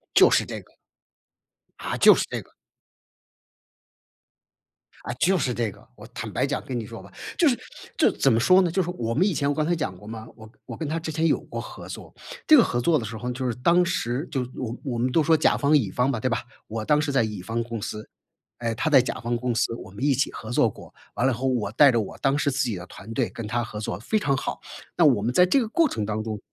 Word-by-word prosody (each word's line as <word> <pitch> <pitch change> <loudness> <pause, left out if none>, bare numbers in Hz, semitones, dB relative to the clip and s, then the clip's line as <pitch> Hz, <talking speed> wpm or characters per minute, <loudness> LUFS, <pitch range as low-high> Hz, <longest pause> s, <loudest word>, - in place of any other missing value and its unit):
就 - - +8
是 - - +3
这 - - -6
个。 - - -25 1.1
啊， - - -3
就 - - +8
是 - - 0
这 - - -3
个。 - - -22 2.5
啊， 120 - -5
就 185 +4 +3
是 130 -5 0
这 115 -3 -1
个。 - - -18
我 - - -12
坦 - - -5
白 - - 0
讲 - - -3
跟 125 -2 -4
你 115 - -5
说 115 +1 -9
吧， - - -15 0.3
就 340 - +4
是 245 - 0 0.4
就 - - +5
是 - - -7
怎 135 - +3
么 115 - +3
说 185 +10 +6
呢， 175 -3 +1
就 190 +3 +1
是 175 - -5
我 115 -8 -3
们 180 - +3
以 200 - 0
前 140 -2 0
我 145 - +1
刚 155 0 0
才 175 - +1
讲 110 - -3
过 105 - -14
嘛， 110 0 -7
我 110 -1 -13 0.2
我 - - -8
跟 160 - -4
他 160 +2 -2
之 160 -1 -5
前 160 +1 0
有 - - +2
过 - - -7
合 - - -9
作。 - - -9 0.3
这 310 - +9
个 240 - +7
合 120 - -1
作 155 +6 +3
的 - - -5
时 110 +1 -6
候， 125 +3 -4
就 130 +1 -4
是 120 - -2
当 170 +9 +3
时 135 -5 -2
就 135 - -1
我 120 -2 -4
我 125 -4 -3
们 125 +2 0
都 160 +4 +3
说 160 +1 +4
甲 155 - +3
方 145 +1 +3
乙 115 -9 -1
方 125 +6 +1
吧， 120 - -2
对 130 - 0
吧， 115 - 0 0.3
我 110 0 -4
当 150 +3 +3
时 150 -1 -1
在 135 -3 +3
乙 105 -4 -4
方 115 +5 -2
公 115 -2 -6
司， 105 +1 -6 0.5
哎， 115 -1 -1
他 155 +8 0
在 140 -4 +7
甲 125 - -4
方 120 +1 -2
公 125 0 -1
司 115 - +1
我 105 - -10
们 105 +7 -8
一 145 -1 +4
起 135 +2 0
合 110 - -9
作 - - +3
过， - - -13 0.2
完 120 - 0
了 135 - +2
以 - - -3
后 130 +4 -2
我 120 -6 0
带 140 +5 +6
着 120 - +1
我 105 - -5
当 135 0 +1
时 145 - +1
自 140 +2 0
己 120 -5 -2
的 90 0 -7
团 100 +3 -11
队 125 -1 0
跟 115 - -7
他 120 +2 -1
合 110 -2 -7
作 95 -4 -4
非 125 - 0
常 145 -7 +1
好。 - - -4 0.3
那 170 - +4
我 125 -8 +4
们 120 +4 -1
在 180 - +6
这 225 +10 +3
个 230 - -1
过 325 +6 +2
程 110 - -3
当 110 +1 -2
中 110 -1 -4
125 Hz, 295 characters per minute, -25 LUFS, 115-155 Hz, 2.5 s, 这